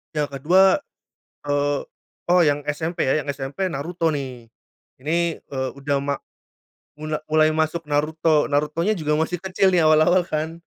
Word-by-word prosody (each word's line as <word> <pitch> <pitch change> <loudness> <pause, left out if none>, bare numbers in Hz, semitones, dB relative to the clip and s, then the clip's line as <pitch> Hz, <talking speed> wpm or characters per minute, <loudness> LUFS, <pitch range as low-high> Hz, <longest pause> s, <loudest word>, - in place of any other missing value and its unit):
Yang 150 -1 0
ke-2, 185 - +5 0.7
eee, 145 0 +1 0.5
oh, 180 0 +5
yang 145 -3 +1
SMP 160 +3 -2
ya, 150 +3 +1
yang - - -12
SMP 140 +7 -3
Naruto 165 +2 -2
nih. 130 -6 -5 0.5
Ini, 170 +3 0
eee, 130 -1 -3
udah 140 0 -1
ma 140 0 -1 0.8
mula 155 0 -4
mulai 155 0 +4
masuk 160 +1 -1
Naruto. 155 +1 +1
Narutonya 150 +7 0
juga 150 -3 0
masih 170 +2 -1
kecil 190 0 +2
nih 175 -2 +4
awal-awal 155 +4 +4
kan. 160 +1 -4
155 Hz, 145 wpm, -22 LUFS, 145-170 Hz, 0.8 s, ke-2